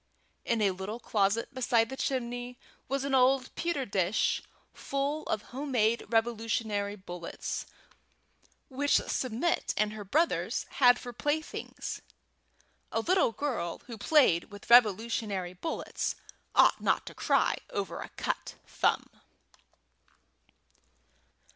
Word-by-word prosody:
In 230 Hz, -2 st, +1 dB
a 195 Hz, -, +4 dB
little 190 Hz, +5 st, -5 dB
closet 215 Hz, +3 st, 0 dB
beside 235 Hz, -3 st, +2 dB
the 265 Hz, -, -5 dB
chimney 245 Hz, -2 st, -3 dB, 0.3 s
was 275 Hz, 0 st, 0 dB
an 280 Hz, 0 st, -2 dB
old 260 Hz, 0 st, +3 dB
pewter 335 Hz, -6 st, -1 dB
dish 195 Hz, -1 st, +1 dB, 0.3 s
full 280 Hz, +3 st, -2 dB
of 215 Hz, -, -1 dB
homemade 245 Hz, -5 st, +1 dB
Revolutionary 225 Hz, -3 st, 0 dB
bullets, 175 Hz, -3 st, -6 dB, 1.0 s
which 285 Hz, +2 st, +1 dB
Submit 255 Hz, +7 st, 0 dB
and 210 Hz, 0 st, +1 dB
her 215 Hz, -1 st, -6 dB
brothers 305 Hz, -, +1 dB, 0.2 s
had 245 Hz, -1 st, +8 dB
for 245 Hz, -, -8 dB
playthings. 295 Hz, +5 st, -3 dB, 0.9 s
A -, -, 0 dB
little 365 Hz, -1 st, +3 dB
girl 230 Hz, -11 st, -3 dB
who 235 Hz, -, -7 dB
played 220 Hz, -, +4 dB
with 205 Hz, +3 st, -10 dB
Revolutionary 215 Hz, -5 st, +4 dB
bullets 320 Hz, -, -3 dB, 0.4 s
ought -, -, +5 dB
not -, -, +1 dB
to -, -, -8 dB
cry -, -, +2 dB
over 195 Hz, -3 st, -3 dB
a -, -, -7 dB
cut -, -, -3 dB
thumb. -, -, +1 dB
235 Hz, 115 wpm, -30 LUFS, 205-270 Hz, 1.0 s, had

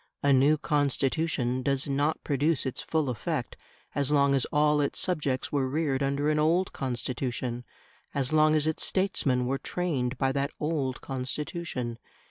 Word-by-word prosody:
A 140 Hz, -1 st, +5 dB
new 140 Hz, +4 st, +5 dB
Constitution 140 Hz, -3 st, 0 dB
does 135 Hz, +2 st, 0 dB
not 145 Hz, +3 st, 0 dB
produce 145 Hz, +2 st, +1 dB
its 130 Hz, -, -2 dB
full 155 Hz, -3 st, 0 dB
effect 125 Hz, -4 st, -3 dB, 0.4 s
as 140 Hz, -1 st, +1 dB
long 140 Hz, -1 st, +4 dB
as 135 Hz, -2 st, +2 dB
all 150 Hz, 0 st, +2 dB
its 140 Hz, -, -1 dB
subjects 150 Hz, -8 st, 0 dB
were 135 Hz, -3 st, 0 dB
reared 140 Hz, -2 st, 0 dB
under 140 Hz, +2 st, +1 dB
an 150 Hz, -, +1 dB
old 170 Hz, +5 st, +2 dB
Constitution, 125 Hz, -1 st, -3 dB, 0.5 s
as 140 Hz, +1 st, 0 dB
long 155 Hz, 0 st, +5 dB
as 155 Hz, -1 st, +2 dB
its 160 Hz, 0 st, 0 dB
statesmen 140 Hz, -10 st, +1 dB
were 135 Hz, +2 st, -1 dB
trained 140 Hz, -8 st, -2 dB
by 135 Hz, +1 st, +1 dB
that 140 Hz, +1 st, -1 dB
old 145 Hz, -4 st, -1 dB
Constitution. 130 Hz, -2 st, -4 dB
140 Hz, 155 wpm, -28 LUFS, 130-155 Hz, 0.5 s, A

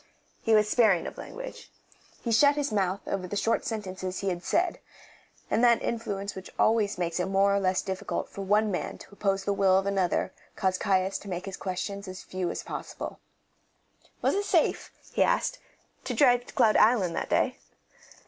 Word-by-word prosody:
He 225 Hz, -1 st, +3 dB
was 210 Hz, 0 st, +4 dB
sparing 210 Hz, -6 st, +3 dB
of -, -, -7 dB
language. -, -, -8 dB, 0.5 s
He 235 Hz, -, -1 dB
shut 285 Hz, +6 st, +5 dB
his 290 Hz, -4 st, -1 dB
mouth 195 Hz, -2 st, 0 dB
over 185 Hz, -2 st, -3 dB
the 205 Hz, -, -5 dB
short 225 Hz, +3 st, +1 dB
sentences 190 Hz, -4 st, -4 dB
he 195 Hz, -, -1 dB
had 175 Hz, -1 st, -3 dB
said, 350 Hz, -, +1 dB, 0.7 s
and 235 Hz, -, +1 dB
that 235 Hz, -1 st, +5 dB
influence 205 Hz, -4 st, -3 dB
which 190 Hz, -1 st, -9 dB
always 215 Hz, -3 st, +2 dB
makes 170 Hz, -1 st, -1 dB
it 180 Hz, -, 0 dB
more 195 Hz, +1 st, +3 dB
or 200 Hz, -, +2 dB
less 185 Hz, -1 st, +1 dB
difficult 190 Hz, 0 st, -3 dB
for 200 Hz, -, -8 dB
one 210 Hz, +2 st, +2 dB
man 180 Hz, -, -3 dB
to -, -, -13 dB
oppose 195 Hz, -1 st, -1 dB
the 200 Hz, -, 0 dB
will 190 Hz, -1 st, +4 dB
of 195 Hz, -, +1 dB
another 190 Hz, -1 st, 0 dB, 0.2 s
caused 185 Hz, -1 st, 0 dB
Caius 190 Hz, 0 st, +1 dB
to 200 Hz, -, -10 dB
make 180 Hz, 0 st, -4 dB
his 195 Hz, -1 st, -5 dB
questions 200 Hz, +2 st, -4 dB
as 185 Hz, 0 st, -8 dB
few 185 Hz, -2 st, -3 dB
as -, -, -4 dB
possible. -, -, -6 dB, 1.0 s
Was -, -, +3 dB
it 405 Hz, +1 st, 0 dB
safe, -, -, +1 dB, 0.2 s
he -, -, +1 dB
asked, -, -, +2 dB, 0.5 s
to -, -, -2 dB
drive 245 Hz, -4 st, +4 dB
to -, -, -11 dB
Cloud 225 Hz, -5 st, +4 dB
Island 210 Hz, -7 st, +4 dB
that -, -, -3 dB
day? -, -, +1 dB
200 Hz, 190 wpm, -28 LUFS, 185-225 Hz, 1.0 s, shut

